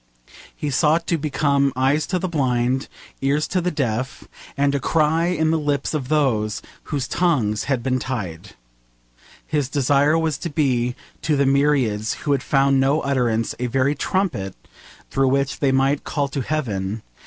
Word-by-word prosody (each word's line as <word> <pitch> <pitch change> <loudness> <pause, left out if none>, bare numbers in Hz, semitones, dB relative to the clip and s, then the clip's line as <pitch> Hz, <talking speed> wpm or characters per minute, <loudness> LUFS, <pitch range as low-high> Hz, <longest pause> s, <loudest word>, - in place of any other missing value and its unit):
He 150 - -3
sought 155 +4 +2
to 170 - +1
become 140 -1 +1
eyes 135 +4 +1
to 185 - 0
the 185 - -2
blind, 130 -5 0 0.3
ears 140 +3 +1
to 185 - 0
the 180 - 0
deaf, 130 -4 -2 0.3
and 140 0 +2
a 140 - +1
cry 160 +4 +2
in 160 -3 +1
the 165 - +1
lips 145 -1 -1
of 140 -5 -2
those 125 -8 +1 0.2
whose 140 -3 -2
tongues 120 -13 +1
had 130 -4 -1
been 130 0 0
tied. 100 -8 -5 0.9
His 145 -4 -1
desire 145 +2 +3
was 160 -4 -1
to 170 - -4
be 125 -5 0 0.3
to 155 -1 +1
the 140 0 +2
myriads 135 -6 +2
who 145 - +1
had 140 -2 +2
found 135 0 +3
no 140 +3 +2
utterance 120 -5 0
a 125 - -1
very 135 +3 +1
trumpet 145 - -1 0.6
through 135 0 +2
which 135 +1 0
they 140 -2 +2
might 135 +2 +2
call 145 -2 -1
to 140 - -3
heaven. 110 -8 -2
140 Hz, 165 wpm, -22 LUFS, 125-150 Hz, 0.9 s, desire